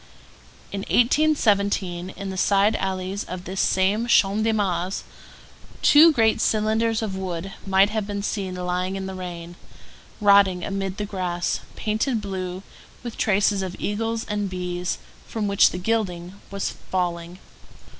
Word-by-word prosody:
In 200 - -3
1817, 200 - +2
in 195 +1 -7
the - - -6
side 200 +3 +3
alleys 190 +1 -3
of 180 0 -7
this 190 +2 -2
same 200 +5 +2
Champ 210 -2 +3
de 225 - +2
Mars, 190 -3 -1 0.8
two 315 +3 +8
great 225 -6 +2
cylinders 220 +1 +1
of 200 -3 -3
wood 190 0 -4
might 195 +2 +4
have 215 -2 -2
been 200 -1 -3
seen 195 -3 -3
lying 180 +1 -2
in 195 0 -4
the 190 - -5
rain, 175 -2 -7 0.6
rotting 200 -3 +5
amid 195 -1 -3
the 210 - -2
grass, 180 -3 -2 0.2
painted 220 +3 -1
blue, 190 -2 -5 0.4
with 240 -2 -6
traces 200 -1 +2
of 185 -1 -4
eagles 225 +2 -2
and 205 -2 -2
bees, 180 -1 -3 0.3
from 215 -2 -2
which 200 -1 +5
the - - -5
gilding 185 -2 -2
was 200 -1 -3 0.2
falling. 175 -1 -2
195 Hz, 145 wpm, -24 LUFS, 185-215 Hz, 0.8 s, two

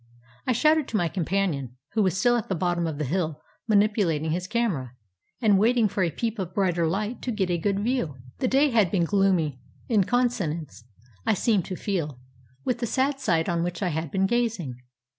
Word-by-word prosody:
I - - +3
shouted 305 +4 +3
to 220 - -1
my 175 -4 +1
companion, 165 - -1 0.2
who 220 - +2
was 190 -2 +1
still 240 +5 +3
at 235 - -2
the 190 - 0
bottom 175 0 0
of 155 -3 -4
the 150 - -2
hill 160 0 -1 0.3
manipulating 200 -8 +2
his 180 +2 -2
camera, 190 - -1 0.5
and 210 -5 +4
waiting 230 +1 +4
for 195 - -2
a 170 - +3
peep 225 +6 -3
of 185 -1 -4
brighter 175 -4 +2
Hght 210 +7 -2
to 250 - -2
get 195 -5 0
a 175 - +1
good 195 +4 0
view. 220 - -1 0.2
The 255 - +1
day 275 +3 +3
had 215 -6 +4
been 175 -1 +1
gloomy, 180 -8 +2 0.3
in 210 -5 +3
consonance, 180 - -1 0.4
I - - +2
seemed 205 -2 +1
to 185 - -4
feel, 165 -10 -3 0.5
with 245 -2 0
the 240 - -1
sad 270 +4 0
sight 165 -9 +1
on 170 -1 0
which 175 +1 -2
I 180 - +1
had 160 0 -3
been 190 +5 +1
gazing. 205 - -1
190 Hz, 200 wpm, -26 LUFS, 165-230 Hz, 0.5 s, and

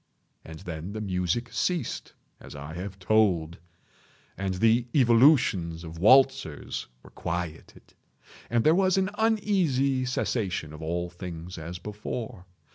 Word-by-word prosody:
And 80 -1 -10
then 85 +3 -6
the 110 - -4
music 95 +4 -2
ceased, 175 -9 -2 0.3
as - - -11
I 70 +2 -7
have 95 +2 -6
told; 95 -5 +2 0.8
and 95 -1 -2
the 115 +5 +3
evolutions 115 - +4
of 80 -1 -8
the 80 - -10
waltzers 130 - +3 0.2
were - - -15
quieted; 85 -2 -6 0.6
and 120 -1 +2
there 155 - +5
was 190 +1 +3
an 190 +1 +1
uneasy 185 - +2
cessation 100 -10 -2
of 75 - -10
all 85 +2 -3
things 90 -1 -8
as 85 +3 -6
before. 105 0 -6
100 Hz, 130 wpm, -27 LUFS, 85-130 Hz, 0.8 s, there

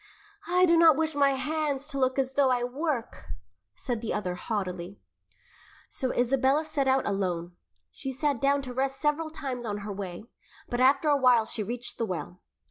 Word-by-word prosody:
"I 360 +1 +4
do 335 -1 +4
not 330 -2 +7
wish 320 0 0
my 280 -1 +3
hands 295 0 -2
to 275 - -3
look 260 0 +1
as 265 -1 0
though 270 0 +3
I 250 -1 +1
work," 260 -1 -3 0.5
said 240 -4 -3
the 230 - -2
other 185 -4 -2
haughtily. 185 -1 -4 0.9
So 260 -1 -2
Isabella 270 +4 +2
set 290 -3 -1
out 265 0 +3
alone. 180 -3 -2 0.4
She 270 - -5
sat 280 -1 -1
down 280 0 +2
to 255 -2 -6
rest 270 +1 -1
several 305 +1 0
times 265 -6 -5
on 205 -2 -4
her 210 - -4
way, 190 -2 -6 0.4
but 240 - -3
after 275 +4 +4
a 290 -1 +4
while 250 -4 +4
she 220 - -3
reached 240 +4 -5
the 230 - 0
well. 180 0 -5
260 Hz, 185 wpm, -28 LUFS, 220-285 Hz, 0.9 s, not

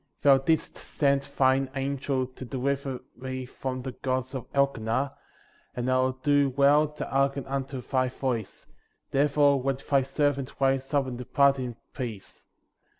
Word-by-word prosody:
Thou 140 -1 +7
didst 155 +4 0
send 140 -1 0
thine 135 0 +3
angel* 135 -1 -1
to 130 +1 -11
deliver 135 +1 -2
me 130 0 -5
from 130 0 -5
the 130 - -4
gods 130 +1 -2
of 130 -3 -6
Elkenah, 135 -1 +1 0.6
and 125 +1 -1
I 130 - +4
will 130 0 +2
do 145 +1 +2
well 140 +3 +4
to 150 0 -6
hearken 140 0 0
unto 135 -1 -3
thy 130 0 0
voice, 125 -5 -3 0.5
therefore 145 0 +3
let 135 0 -2
thy 140 -2 +4
servant 140 0 -1
rise 135 0 +1
up 140 -2 +2
and 125 -2 -6
depart 140 +2 +3
in 125 -2 -4 0.2
peace. 115 -7 -7
135 Hz, 150 wpm, -27 LUFS, 130-140 Hz, 0.6 s, Thou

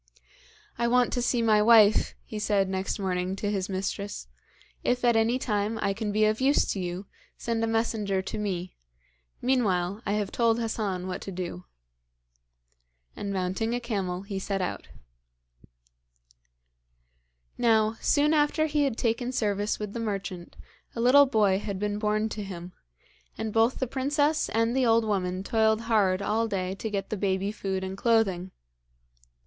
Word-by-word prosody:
'I 235 - +2
want 245 0 +3
to 245 - 0
see 240 -1 +1
my 215 -2 +4
wife,' 215 -1 +5
he 215 - -6
said 205 -2 +1
next 190 0 -2
morning 185 -1 -2
to 205 +1 -2
his 195 -1 -2
mistress. 195 - -4 0.6
'If 250 0 +1
at 240 -1 +4
any 225 +3 +3
time 215 -3 -1
I 200 - 0
can 210 0 -3
be 215 +1 +3
of 215 +3 +1
use 275 +2 +3
to 195 - -4
you, 180 +2 -4 0.3
send 230 -1 -2
a - - +1
messenger 225 -3 0
to 205 - -5
me; 185 -3 -3 0.7
meanwhile, 205 -6 +1
I 205 - -1
have 210 -2 -1
told 230 -1 +2
Hassan 210 -5 -2
what 185 -1 -4
to 195 - -6
do.' 180 0 -6 1.5
And 200 - -4
mounting 190 +5 -1
a - - -1
camel 195 -6 -3
he 200 -1 -4
set 195 0 -2
out. 180 - -4 2.7
Now, 220 -1 +3
soon 300 +1 +3
after 305 +1 +2
he 300 -1 +1
had 255 -5 -2
taken 240 +2 0
service 205 -3 0
with 210 -1 -5
the 235 - -4
merchant 195 -5 -4 0.4
a - - -4
little 270 +4 +6
boy 205 -6 +2
had 200 -2 -4
been 205 +1 -2
born 215 0 +1
to 215 - -5
him, 180 -2 -8 0.6
and 220 -1 -3
both 225 +3 +3
the 260 - -1
princess 290 +4 0
and 230 +2 +1
the 265 - +2
old 230 -1 +3
woman 185 -3 -1
toiled 220 +1 +2
hard 205 -5 +2
all 225 +3 +1
day 185 -3 -2
to 220 +3 -5
get 200 -2 -4
the 215 - -1
baby 195 0 0
food 190 -3 -3
and 190 0 -4
clothing. 200 -6 +2
210 Hz, 165 wpm, -27 LUFS, 195-230 Hz, 2.7 s, little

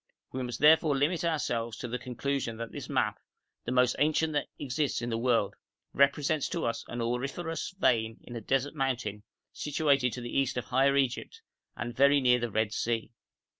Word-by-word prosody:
We 130 - -4
must 125 -1 -4
therefore 155 -1 +6
limit 160 +6 +1
ourselves 120 -9 -1
to 125 - -5
the 125 +1 -3
conclusion 125 -1 -3
that 115 0 -6
this - - -7
map, - - 0 0.5
the 120 - -2
most 125 -1 +3
ancient 155 +1 +2
that 145 - 0
exists 145 +1 -1
in 120 0 -3
the 115 - 0
world, 115 -4 +2 0.4
represents 140 +2 +2
to - - -2
us 115 - -2
an 120 - -4
auriferous 135 +8 -2
vein 115 -9 +2
in 120 - -9
a 115 - -4
desert 135 +5 0
mountain 125 -7 -2 0.3
situated 140 -4 +1
to 125 - -5
the 120 - -6
east 135 -2 +1
of 125 - -2
Higher 135 +4 +3
Egypt, 140 - -1 0.3
and 120 0 -4
very 140 +1 +5
near 125 -2 +4
the 120 0 -2
Red 110 0 0
Sea. 115 0 -1
130 Hz, 185 wpm, -29 LUFS, 120-145 Hz, 0.5 s, therefore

